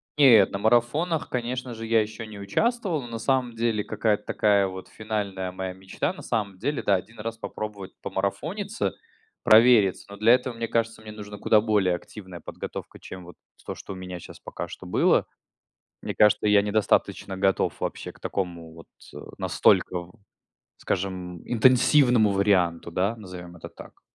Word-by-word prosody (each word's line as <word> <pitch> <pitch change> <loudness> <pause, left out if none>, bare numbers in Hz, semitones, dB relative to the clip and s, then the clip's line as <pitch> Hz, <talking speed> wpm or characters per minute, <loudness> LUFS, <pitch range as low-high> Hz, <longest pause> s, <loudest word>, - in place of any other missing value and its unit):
Нет, 120 -9 +7
на 100 - -2
марафонах, 120 - +1
конечно 125 0 -3
же, 115 0 -6
я 115 0 +3
еще 110 +1 -6
не 105 -2 -10
участвовал. 190 - 0
Но, - - -8
на 115 -1 -6
самом 130 0 0
деле, 115 -2 0
какая-то 105 -1 0
такая 100 -2 +2
вот 95 0 -8
финальная 100 -4 -4
моя 95 0 -5
мечта, 95 +1 -3
на - - -11
самом 100 -4 -2
деле, 135 +8 -2
да, 100 - +3
1 110 +5 -6
раз 115 +1 -5
попробовать 105 -4 -6
помарафониться, 180 - -3 0.5
провериться, 110 -4 +5
но 100 - -9
для 110 +3 +5
этого, 125 -1 0
мне 115 0 -3
кажется, 115 0 -1
мне 110 - -9
нужна 105 -1 -9
куда 105 +1 +4
более 105 -5 +2
активная 95 -1 -10
подготовка, - - -8
чем 90 -1 -10
вот 90 - -13 0.3
то, - - -5
что - - -8
у - - -9
меня 90 -1 -7
щас - - -12
пока - - -6
что - - -10
было. - - +3 0.8
Мне - - -4
кажется, 105 0 +4
я 105 -1 +5
недостаточно 105 -2 0
готов 95 0 0
вообще - - -4
к - - -21
такому 85 -4 -4
вот, 80 0 -13 0.3
э, - - -12 0.2
настолько, 85 -1 +2 0.7
скажем, 90 -2 -3
интенсивному 125 -1 +5
варианту, 95 -4 +1
да, 100 +6 0
назовём 90 -4 -10
это - - -9
так. - - -14
105 Hz, 165 wpm, -25 LUFS, 95-115 Hz, 0.8 s, Нет